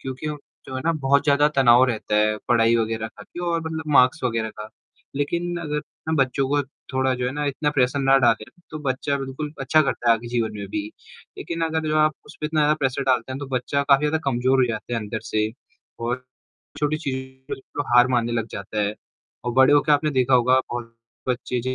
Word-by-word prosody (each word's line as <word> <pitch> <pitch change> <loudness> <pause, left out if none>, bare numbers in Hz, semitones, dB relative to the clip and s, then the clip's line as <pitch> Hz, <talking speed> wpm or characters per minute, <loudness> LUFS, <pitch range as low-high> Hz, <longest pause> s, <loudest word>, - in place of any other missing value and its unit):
क्योंकि 130 +3 -5
वो 150 -1 -4 0.3
जो 130 - -7
है - - -3
ना 165 - +3
बहुत 140 -2 +2
ज़्यादा 145 0 +4
तनाव 125 -1 +6
रहता 110 -3 -1
है 105 0 +3
पढ़ाई 115 -1 +4
वगैरह 110 -1 -1
का - - -10
भी 175 - -10
और 165 -1 0 0.3
मार्क्स 130 -3 +4
वगैरह 115 -2 -1
का। 105 - -7 0.5
लेकिन 170 +5 -1
अगर 150 -2 -2 0.3
हम 160 - +1
बच्चों 135 0 +1
को 145 +1 +2 0.3
थोड़ा 130 0 +1
जो 125 0 -2
है 125 - -2
ना 150 +1 -2
इतना 145 +2 0
प्रेशर 135 -1 +1
ना 135 0 +5
डालें, 115 -4 +3 0.3
तो 155 - -6
बच्चा 135 +2 -1
बिल्कुल 135 +2 -5
अच्छा 155 -1 +4
करता 120 -4 -1
है - - +7
आगे 115 +1 -6
जीवन 115 -2 -1
में 100 - -5
भी, 105 +1 -2 0.6
लेकिन 170 0 -5
अगर 160 -1 -1
जो 155 - +1
आप 155 0 +3
उस - - -13
पे 150 - -1
इतना 150 -1 +2
प्रेशर 135 0 0
डालते 130 -1 +1
हैं, 130 - -5
तो 145 - -5
बच्चा 135 +2 -1
काफ़ी 140 -1 +4
ज़्यादा 160 +2 +1
कमज़ोर 130 0 +2
हो - - 0
जाता 110 +1 -4
है - - 0
अंदर 110 +1 -5
से। 110 0 0 0.5
और 120 +2 -2 0.5
छोटी 150 +1 +1
चीज़ 140 -4 -3 0.4
बिल्कुल 145 +2 -5
हार 120 +1 +7
मानने 120 -2 +1
लग 115 -2 -1
जाता 100 +2 -4
है 105 +1 -1 0.5
और 120 - -1
बड़े 130 +3 +5
होके 145 +1 +4
आपने 150 +1 +2
देखा 130 -2 +2
होगा 125 +1 +4
बहुत 120 -1 -5 0.3
बच्चे 125 0 -1
130 Hz, 215 wpm, -23 LUFS, 120-145 Hz, 0.6 s, है